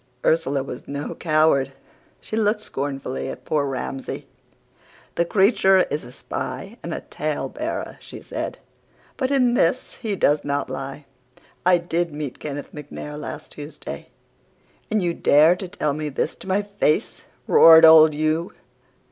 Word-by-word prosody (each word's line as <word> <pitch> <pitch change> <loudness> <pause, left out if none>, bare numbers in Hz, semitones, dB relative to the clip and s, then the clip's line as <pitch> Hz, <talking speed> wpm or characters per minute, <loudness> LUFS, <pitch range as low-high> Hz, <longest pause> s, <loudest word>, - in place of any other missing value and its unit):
"Ursula 145 -4 +2
was 125 -2 -8
no 140 +1 -4
coward. 155 -4 +2 0.5
She - - -6
looked 210 -1 +1
scornfully 135 -6 -4
at - - -8
poor 145 -2 0
Ramsay. 135 0 -5 0.9
"'The 170 - +1
creature 195 0 +4
is 150 +2 -2
a 120 - -11
spy 195 - -6
and - - -6
a - - -4
tale - - -3
bearer,' - - -5
she - - -10
said, - - -5 0.6
'but 260 -2 -1
in 255 -4 +3
this 240 +2 0
he 215 -4 -1
does 150 -5 +2
not 140 -2 -2
lie. 135 +2 -6 0.6
I 180 -1 +6
DID 170 -2 -2
meet 150 -4 -5
Kenneth 145 -1 -6
MacNair 150 0 -8
last 150 - -7
Tuesday.' 150 +1 -8 0.8
"'And 215 -3 +1
you 170 -1 0
dare 155 +2 +5
to 190 +1 -7
tell 160 -6 -2
me 155 +1 -3
this 145 +3 -2
to - - -13
my 195 +2 +1
face!' 200 -7 0 0.2
roared 165 0 +8
old 160 -1 +8
Hugh. 155 +3 -1
155 Hz, 150 wpm, -23 LUFS, 145-190 Hz, 0.9 s, roared